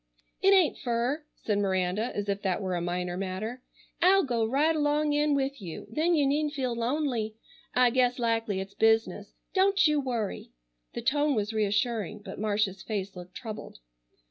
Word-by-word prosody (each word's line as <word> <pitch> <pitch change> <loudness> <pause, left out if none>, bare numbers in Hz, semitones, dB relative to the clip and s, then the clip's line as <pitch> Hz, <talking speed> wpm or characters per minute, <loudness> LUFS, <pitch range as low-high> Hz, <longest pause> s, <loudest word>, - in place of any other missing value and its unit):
"It 390 - +5
ain't 375 -6 +4
fur," 245 +5 -1
said 205 -2 -1
Miranda 190 +3 0
as 205 0 -2
if 200 0 -1
that 185 -3 0
were 190 -2 -2
a 175 - -1
minor 175 0 -2
matter. 195 +6 -4 0.4
"I'll 380 +2 +6
go 240 -5 0
right 285 +8 +2
along 295 0 +1
in 295 0 +2
with 275 -2 -1
you, 170 -4 -7
then 330 +7 +2
you 290 -3 +3
needn't 295 +2 0
feel 255 -3 -1
lonely. 235 -3 -1 0.4
I 250 -1 +5
guess 250 0 +2
likely 225 -4 0
it's 195 +1 -6
business. 225 +2 +1 0.2
Don't 390 +1 +4
you 300 -1 +3
worry." 230 - -3 0.4
The - - -4
tone 290 0 +2
was 210 0 -1
reassuring, 215 -1 0
but - - -7
Marcia's 205 -2 0
face 200 -2 -4
looked 180 +1 -10
troubled. 220 -3 -7
230 Hz, 170 wpm, -28 LUFS, 200-290 Hz, 0.4 s, I'll